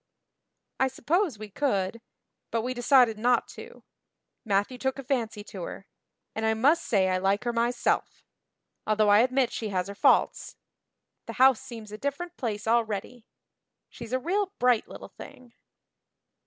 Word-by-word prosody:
"I 265 - +3
suppose 295 - -1
we 210 -1 -9
could, 215 -4 -1 0.5
but 230 -1 -1
we 255 +1 -2
decided 245 -3 +4
not 245 +1 +2
to. - - -12 0.6
Matthew 205 +4 0
took 265 +1 -1
a 275 - -6
fancy 230 -6 -2
to 195 -3 -9
her. 190 - -7 0.5
And 220 - -4
I 220 0 +2
must 290 +9 +3
say 195 -4 +2
I 185 0 +1
like 195 +2 +1
her 240 -1 -1
myself 235 +1 -1 0.6
although 215 -1 +3
I 205 +1 +7
admit 255 +1 +2
she 220 - -4
has 185 -2 -1
her - - -5
faults. 200 - +2 0.7
The - - -5
house 260 -2 +5
seems 225 -4 -10
a 210 - -8
different 335 +5 -4
place 215 -8 -4
already. 225 0 -1 0.6
She's 235 -1 -10
a 255 - +2
real 380 +8 -1
bright 245 -3 +2
little - - -10
thing." 250 -2 -13
235 Hz, 155 wpm, -27 LUFS, 210-260 Hz, 0.7 s, I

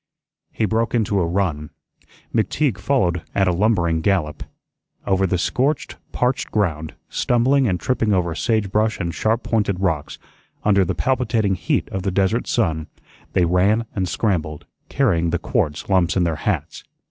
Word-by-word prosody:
He 110 - 0
broke 115 +3 0
into 105 -3 +1
a 85 - +1
run. 85 -5 -1 0.6
McTeague 115 +3 0
followed 90 - +1
at 95 -1 +3
a - - +3
lumbering 85 -4 +1
gallop. 75 -6 0 0.6
Over 95 0 +2
the 90 - 0
scorched, 135 - 0 0.2
parched 125 +1 0
ground, 80 -7 -1
stumbling 130 +2 +2
and 90 -3 0
tripping 115 -4 0
over 90 -4 +1
sage 110 +1 0
brush 110 +1 +1
and 85 -3 -2
sharp 110 +6 0
pointed 105 -5 0
rocks, 80 -6 -1 0.5
under 100 -2 +4
the 90 - -2
palpitating 115 -6 +1
heat 90 - -1
of 95 - -3
the 95 - -1
desert 95 +5 0
sun, 80 -9 0 0.5
they 90 - +3
ran 100 +6 +2
and 95 -3 -1
scrambled, 80 -6 -1 0.2
carrying 90 -12 +1
the 85 - 0
quartz 85 - -2
lumps 95 -2 +2
in 90 - +3
their 80 -3 0
hats. - - -3
95 Hz, 160 wpm, -21 LUFS, 85-110 Hz, 0.6 s, under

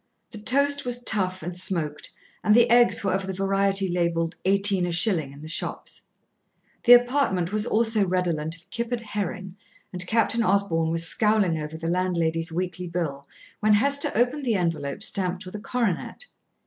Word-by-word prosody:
The 215 - -9
toast 280 +5 +1
was 245 0 -2
tough 185 -6 0
and 175 +2 -5
smoked, 170 -5 -2 0.3
and 210 - +4
the 240 -1 +4
eggs 240 -2 +4
were 195 - 0
of 190 0 -2
the 190 - -3
variety 195 0 +1
labelled 170 -1 -1
"18 195 -1 +2
a - - -2
shilling" 170 -6 +1
in 140 +2 -13
the - - -8
shops; 155 - -5 0.8
the 245 - +9
apartment 245 -8 +3
was 215 +2 0
also 220 -2 +1
redolent 170 -3 -1
of 170 +3 -15
kippered 235 0 -3
herring, 195 -3 -5 0.4
and 180 0 -5
Captain 225 +1 +2
Osborn 185 -6 +1
was 165 0 +1
scowling 210 -4 +2
over 155 +1 -6
the 165 0 -5
landlady's 170 -2 -1
weekly 180 +1 -4
bill 155 -5 -4 0.3
when 210 0 +4
Hester 280 +6 +2
opened 250 +6 +1
the 235 -4 +1
envelope 165 -2 -2
stamped 185 -4 0
with 185 - -10
a 210 - -5
coronet. 235 - -2
190 Hz, 170 wpm, -25 LUFS, 170-220 Hz, 0.8 s, the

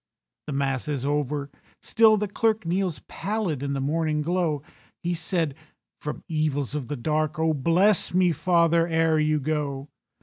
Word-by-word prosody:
The 150 - -3
Mass 135 -1 -1
is 140 -3 -2
over—still 145 - +1
the 210 0 -1
clerk 220 0 0
Kneels 180 -1 -1
pallid 200 -9 -2
in 140 0 -2
the 135 - -2
morning 150 +2 0
glow. 165 -4 0 0.4
He 175 +1 0
said, 165 -3 0 0.5
"From 150 - -6
evils 150 -4 -1
of 145 -5 -3
the 145 - -4
dark 155 +5 -1
Oh, 160 0 +2
bless 170 +8 +3
me, 180 -1 +3
father, 170 +1 +3
ere 160 -1 +2
you 155 0 +2
go. 145 -1 -2
155 Hz, 155 wpm, -25 LUFS, 145-175 Hz, 0.5 s, bless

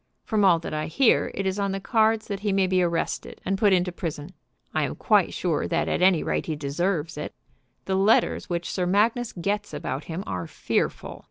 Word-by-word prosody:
From 215 -2 0
all 180 -3 +6
that 165 - -6
I 155 0 -2
hear, 240 - +3
it 195 - -2
is 190 +1 -1
on 200 -1 0
the 195 - -2
cards 220 +1 +2
that 200 -2 -4
he 205 0 -1
may 195 -1 +3
be 185 0 +2
arrested 170 -2 -2
and 195 - +1
put 205 +1 +3
into 180 -1 +2
prison. 165 -2 -5 0.4
I - - +1
am - - -4
quite - - +3
sure - - -1
that - - 0
at - - -1
any 185 -3 +4
rate - - -2
he 160 - -1
deserves 155 +2 -2
it. - - -6 0.5
The 190 - -1
letters 195 +3 +2
which 170 -1 -2
Sir 180 -2 -1
Magnus 220 +5 +2
gets 205 +4 -3
about 140 +3 -4
him 170 +3 -5
are 90 -3 -4
fearful. - - -2
185 Hz, 210 wpm, -25 LUFS, 165-200 Hz, 0.5 s, all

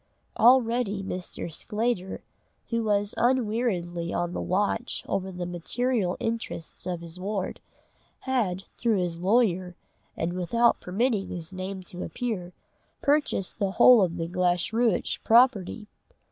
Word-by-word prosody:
Already 235 -4 +4
Mr. 180 -3 -5
Sclater, 215 -1 -2 0.5
who 230 -1 0
was 205 -1 +1
unweariedly 210 -9 0
on 175 0 -1
the - - -3
watch 205 +6 -1
over 190 0 -2
the 180 -1 -5
material 185 +3 -1
interests 225 -9 -4
of 175 -2 -3
his 170 +1 -10
ward, 195 0 -3 0.6
had, 215 -9 -1 0.2
through 230 -3 +2
his 175 -2 -2
lawyer, 185 -3 +2 0.4
and 165 +2 -1
without 230 +7 +2
permitting 205 +2 0
his 170 0 -5
name 185 0 -5
to 180 0 -9
appear, 210 -8 -4 0.5
purchased 285 -11 +1
the 195 -2 0
whole 245 +1 +7
of 180 -2 0
the 165 -1 -2
Glashruach 180 +5 +1
property. 225 -3 +3
195 Hz, 125 wpm, -27 LUFS, 180-230 Hz, 0.6 s, whole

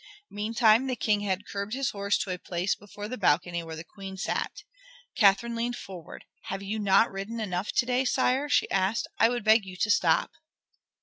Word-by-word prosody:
Meantime 220 +3 +3
the 255 - -1
King 210 -3 +1
had 200 -1 -2
curbed 200 +3 -4
his 270 -2 -1
horse 200 0 0
to 190 - -3
a 180 - -4
place 180 +2 -1
before 205 0 -9
the 255 +1 -6
balcony 175 -1 +2
where 165 -1 -7
the 160 - -7
Queen 195 +1 -9
sat. 190 - -3 0.5
Catherine 205 +2 +4
leaned 235 +1 -2
forward. 185 -8 -10 0.2
"Have 195 +1 -4
you 210 +2 -3
not 200 +2 +4
ridden 200 +4 -5
enough 190 -2 -2
to 240 - +2
day, 250 +1 +1
sire?" 265 +2 +1
she - - +3
asked. 195 +3 +1
"I 225 - +6
would 240 -1 -2
beg 220 +1 +5
you 185 -1 -9
to 210 +3 +1
stop." - - +3
205 Hz, 195 wpm, -28 LUFS, 190-230 Hz, 0.5 s, I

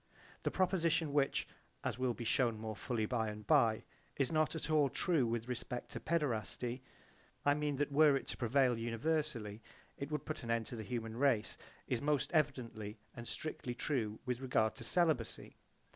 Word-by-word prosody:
The - - 0
proposition 170 -5 +1
which 140 -2 +2 0.4
(as - - -2
will 125 -2 +1
be 120 - -5
shewn 115 0 +2
more 110 0 -4
fully 115 0 -1
by 110 0 0
and 105 0 -7
by) 115 -8 +4 0.3
is 135 0 +1
not 155 0 +2
at 160 0 -3
all 150 -3 +4
true 145 -1 +2
with 115 0 -2
respect 125 0 -4
to - - -3
paederasty, 125 - -1 0.6
I 145 - +6
mean 150 -1 0
that 145 +1 0
were 145 0 +6
it 135 - -2
to - - -3
prevail 125 0 +3
universally 115 -2 -1 0.4
it 140 - -3
would 150 -2 -3
put 155 - -4
an 120 - -7
end 115 -1 +1
to 120 - -5
the 110 - -5
human 115 0 -4
race, 130 -5 +2 0.3
is 120 -2 0
most 145 -2 +1
evidently 120 -8 0 0.2
and 120 0 -7
strictly 130 -5 -4
true 115 -6 -1
with 125 -2 -1
regard 125 -4 +2
to 120 - -7
celibacy. 155 -5 +1
125 Hz, 180 wpm, -36 LUFS, 115-150 Hz, 0.6 s, I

